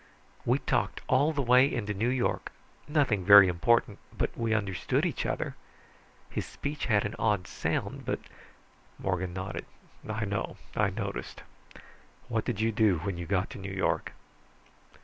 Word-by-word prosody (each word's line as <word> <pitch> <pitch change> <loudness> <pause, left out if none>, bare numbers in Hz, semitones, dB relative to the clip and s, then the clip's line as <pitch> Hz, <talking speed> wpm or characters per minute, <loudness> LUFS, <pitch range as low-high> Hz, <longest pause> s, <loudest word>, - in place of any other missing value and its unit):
We - - +4
talked - - -1
all 140 +5 +3
the 145 -3 -1
way 125 +3 +5
into 105 -3 -2
New 110 +5 0
York 125 -1 -1 0.4
nothing 140 - +2
very 100 0 +9
important, 100 +4 +2 0.2
but - - -1
we 115 -1 -1
understood 100 -5 0
each - - -1
other. - - -2 0.7
His - - -3
speech 145 +1 -5
had 105 -4 +3
an 105 - -3
odd 105 -5 +1
sound, - - -3
but - - -2 0.4
" - - -32 0.3
Morgan 95 -1 -2
nodded. 95 +1 -5 0.4
"I 110 0 -1
know, 100 0 -3 0.2
I 105 -1 +3
noticed. 100 0 -5 0.9
What 115 -2 -1
did 115 -5 -2
you 110 +1 +2
do 105 -4 +3
when 95 -3 -3
you 85 - -5
got 95 -1 0
to - - -8
New 95 0 -6
York?" 95 0 -1
105 Hz, 160 wpm, -29 LUFS, 95-120 Hz, 0.9 s, very